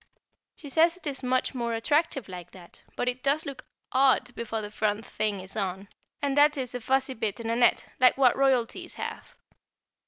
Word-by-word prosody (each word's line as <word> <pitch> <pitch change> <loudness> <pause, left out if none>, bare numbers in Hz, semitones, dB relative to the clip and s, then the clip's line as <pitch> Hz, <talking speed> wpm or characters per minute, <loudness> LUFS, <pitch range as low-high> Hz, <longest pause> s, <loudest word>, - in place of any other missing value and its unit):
She 295 - -11
says 330 +5 +3
it 365 - -18
is 280 -3 -3
much 255 +1 0
more 235 -2 -2
attractive 285 - 0
like 180 -2 -8
that, 175 -2 -14
but 245 - -2
it 250 +1 -1
does 280 +4 +1
look 275 -2 -7 0.3
odd 260 -2 +3
before 225 -1 -4
the 210 - -6
front 215 0 -1
thing 210 -2 -2
is 190 +2 -6
on, 195 -1 -3 0.3
and 280 -1 +1
that 295 +1 +5
is 255 -2 -4
a 250 - -3
fuzzy 265 +3 +1
bit 220 -3 -3
in 230 0 -3
a - - +1
net, 240 0 +3
like 255 0 +5
what 260 -3 +5
Royalties 270 +6 +1
have. - - -7
250 Hz, 195 wpm, -27 LUFS, 220-275 Hz, 0.3 s, that